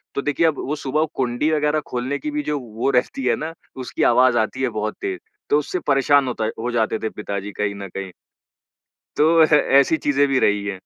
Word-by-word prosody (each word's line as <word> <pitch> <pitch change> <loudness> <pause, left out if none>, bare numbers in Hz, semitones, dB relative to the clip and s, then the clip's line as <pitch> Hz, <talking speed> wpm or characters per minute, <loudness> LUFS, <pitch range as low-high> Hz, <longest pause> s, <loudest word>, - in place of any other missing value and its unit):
तो 140 - 0
देखिए 150 +3 +1
अब 155 - -1
वो 150 - -1
सुबह 150 +3 0
कुंडी 130 +5 0
वग़ैरह 150 0 +1
खोलने 125 +3 -3
की 300 - -4
भी 295 0 -2
जो 145 - -1
वो 120 +2 -3
रहती 130 +1 0
है - - +3
ना, 160 +2 -5 0.2
उसकी 130 -1 -3
आवाज़ 125 -1 +4
आती 120 +4 -2
है 125 - +2
बहुत 105 0 -3
तेज़, 380 -2 -3 0.3
तो 150 - +5
उससे 180 +5 -3
परेशान 140 0 +3
होता 110 -3 -2
हो 120 +2 -2
जाते 110 -1 0
थे 110 - -2
पिताजी 100 -1 -5
कहीं 100 -1 -1
न 100 -1 -7
कहीं। 95 -1 -5 1.1
तो 150 - +4 0.3
ह - - +8 0.3
ऐसी 160 +4 +2
चीज़ें 145 0 +3
भी 135 -1 +2
रही 105 -3 +2
हैं। 100 -2 -3
130 Hz, 215 wpm, -21 LUFS, 110-150 Hz, 1.1 s, ह